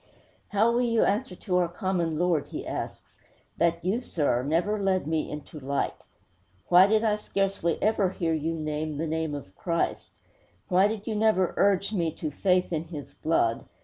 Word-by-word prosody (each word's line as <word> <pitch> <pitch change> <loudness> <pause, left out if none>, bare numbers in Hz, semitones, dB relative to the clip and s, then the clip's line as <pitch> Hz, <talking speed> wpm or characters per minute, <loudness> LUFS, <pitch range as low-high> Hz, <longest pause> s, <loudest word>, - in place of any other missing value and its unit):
'How 215 +3 +3
will 240 +1 +2
you 230 -2 +2
answer 200 -2 0
to 180 -1 -1
our 180 -1 +3
common 175 -3 -1
Lord,' 170 -3 +1
he - - -6
asks, - - -6 0.4
'that 170 0 +1
you, 210 +7 +1
sir, 145 - 0
never 175 +9 0
led 190 -4 +1
me 160 0 -1
into 150 +1 -8
light? 140 0 -1 0.8
Why 180 +2 +8
did 215 +1 +2
I 210 -2 +2
scarcely 195 -5 -1
ever 210 -3 +2
hear 170 -3 -1
you 160 +1 -1
name 155 -1 -3
the 160 - -1
name 160 -1 -2
of 115 -10 -9
Christ? 170 -1 -2 0.6
Why 185 +2 +5
did 215 -1 -4
you 225 - -2
never 210 -4 +2
urge 200 +1 +2
me 170 -5 +1
to 155 -2 -4
faith 180 +3 +1
in 160 0 -1
His 155 -4 -8
blood? 115 -8 0
175 Hz, 180 wpm, -27 LUFS, 155-200 Hz, 0.8 s, Why